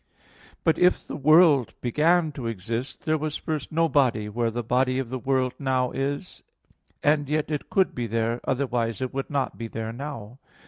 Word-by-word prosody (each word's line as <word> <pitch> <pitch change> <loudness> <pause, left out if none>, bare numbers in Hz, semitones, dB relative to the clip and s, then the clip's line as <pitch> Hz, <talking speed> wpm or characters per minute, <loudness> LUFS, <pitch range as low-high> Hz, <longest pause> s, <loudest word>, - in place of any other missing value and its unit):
But 160 - +2
if 180 0 +3
the - - -6
world 155 -3 +5
began 155 +6 +2
to 130 -5 -5
exist, 115 +4 -4
there 155 0 +1
was 155 0 -3
first 155 -3 -4
no 165 +1 +2
body 125 -8 +2
where 115 +2 0
the 120 +1 -3
body 130 +2 +1
of 130 -3 -2
the 130 +1 -4
world 130 -1 0
now 130 -3 0
is; 140 +6 -4 0.6
and 145 -1 +2
yet 155 0 0
it 150 - -3
could 190 -1 +2
be 120 -1 -3
there, 115 +2 -1
otherwise 125 -4 -1
it 130 - -4
would 135 0 -3
not 140 -5 -2
be 115 - -4
there 115 0 -5
now. 125 -3 -7
130 Hz, 185 wpm, -25 LUFS, 120-150 Hz, 0.6 s, world